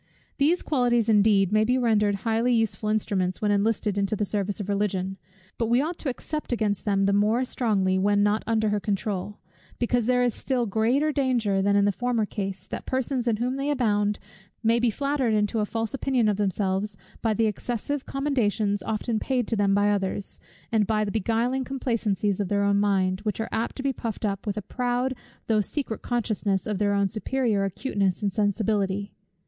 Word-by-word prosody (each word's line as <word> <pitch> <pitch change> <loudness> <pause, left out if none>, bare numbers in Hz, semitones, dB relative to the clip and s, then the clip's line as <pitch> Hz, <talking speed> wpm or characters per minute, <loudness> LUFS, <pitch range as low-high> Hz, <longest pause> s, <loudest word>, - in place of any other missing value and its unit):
These 320 +6 +3
qualities 240 -5 +2
indeed 205 -3 +4
may 215 0 +4
be 250 +4 +2
rendered 215 -4 +2
highly 230 +2 +2
useful 215 -2 0
instruments, 195 -4 0
when 210 -1 +1
enlisted 205 0 +1
into 200 +2 0
the 210 - -1
service 205 0 -2
of 200 - -4
Religion. 195 -2 -1 0.4
But 230 - +1
we 240 +2 +3
ought 325 +5 -2
to 290 - -2
except 300 +4 -5
against 215 -4 0
them 195 -2 +2
the 200 - +2
more 215 +5 +2
strongly, 195 -7 +1
when 205 +1 +3
not 205 +1 +2
under 220 -1 +2
her 210 0 +1
controul; 205 0 -3 0.4
because 240 -1 0
there 250 0 +3
is 245 -2 +1
still 255 -3 -1
greater 235 +9 +1
danger 245 -9 +1
than 200 +1 +2
in 200 0 +4
the 205 - +3
former 235 +2 0
case, 195 -2 -5
that - - -7
persons 260 -1 -1
in 230 - +3
whom 250 +4 -1
they 275 +1 -1
abound, 210 -7 +1 0.5
may 230 +1 +3
be 240 0 +3
flattered 275 -1 0
into 210 +1 +1
a 210 - 0
false 225 +3 -3
opinion 260 -4 +1
of 205 -2 +1
themselves 195 0 -1 0.2
by 220 -2 +1
the 225 - +2
excessive 245 +6 -3
commendations 220 -8 0
often 220 +2 -2
paid 250 -3 -1
to 230 - +1
them 200 -2 +2
by 205 0 +3
others, 195 0 -2 0.3
and 215 -3 +2
by 215 -1 +1
the 200 - -3
beguiling 230 +5 0
complacencies 215 -7 -1
of 200 - 0
their 200 +1 +1
own 200 0 +3
minds, 190 -2 +1
which 210 -2 -2
are 225 - -2
apt 230 - -2
to 265 - -5
be 275 -1 +1
puffed 225 -3 -4
up 200 +1 -3
with 205 - -2
a 210 - -3
proud 250 +2 -1 0.3
though 215 -2 +2
secret 235 +1 -3
consciousness 210 -5 -1
of 210 -3 -2
their 205 -1 +2
own 200 0 +2
superior 220 0 0
acuteness 195 -1 -1
and 200 -2 0
sensibility. 205 -1 0
215 Hz, 195 wpm, -26 LUFS, 200-240 Hz, 0.5 s, indeed